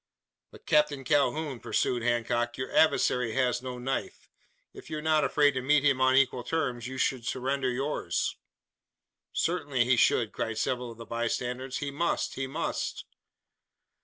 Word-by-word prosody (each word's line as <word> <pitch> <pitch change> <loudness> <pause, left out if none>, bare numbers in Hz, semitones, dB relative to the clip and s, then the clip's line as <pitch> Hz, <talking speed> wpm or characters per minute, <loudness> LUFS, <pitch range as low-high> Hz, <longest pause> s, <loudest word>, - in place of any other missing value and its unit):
"But, - - -16
Captain 150 -2 +2
Calhoun," 145 0 +1
pursued 120 +1 0
Hancock, 120 0 0
"your 130 - -5
adversary 125 -7 +3
has 125 -1 +1
no 125 -1 -6
knife. 130 +2 -4 0.5
If - - -12
you 155 - -3
are - - -4
not 155 -1 +3
afraid 145 -1 +4
to 130 -2 -3
meet 145 +2 +3
him 135 -2 +3
on 130 0 +4
equal 130 -2 +3
terms 125 -5 -2
you 130 +1 -6
should 130 -2 0
surrender 130 +2 -1
yours." 135 +4 -1 1.0
"Certainly 145 -8 0
he 125 0 +3
should!" 115 -1 +3
cried 115 -1 -3
several 125 +1 -1
of 115 - -12
the 115 - -9
bystanders. 125 +3 -3
"He 145 -1 -3
must! 170 +5 -1
he 135 0 -3
must!" 155 +5 -3
130 Hz, 160 wpm, -28 LUFS, 125-145 Hz, 1.0 s, afraid